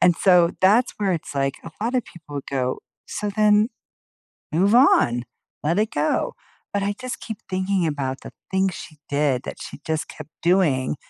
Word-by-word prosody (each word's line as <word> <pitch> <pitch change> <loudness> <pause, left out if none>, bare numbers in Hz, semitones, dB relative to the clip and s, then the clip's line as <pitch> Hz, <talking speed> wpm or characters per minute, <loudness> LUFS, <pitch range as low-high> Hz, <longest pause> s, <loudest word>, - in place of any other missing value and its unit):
and 175 -2 +5
so 180 -3 +5
that's 215 +7 +4
where 200 -3 +1
it's 160 -3 -4
like, 135 -1 0
a 165 - -7
lotta 245 +3 +1
people 150 -7 -8
go, 130 -2 -1 0.3
"So 210 - -3
then, 210 +1 +4 0.8
move 195 +7 +3
on. 120 - +5 0.4
Let 165 +5 +1
it 215 +1 +1
go." 150 +1 0 0.4
But 200 - 0
I 200 +1 0
just 255 0 -5
keep 220 -3 -6
thinking 185 -1 +1
about 135 -3 -3
the - - -9 0.2
things 190 -1 +1
she 155 - -9
did 140 -3 +1
that - - -6
she - - -8
just 160 0 -1
kept 155 0 -10
doing 165 -8 +2
175 Hz, 175 wpm, -23 LUFS, 145-205 Hz, 0.8 s, and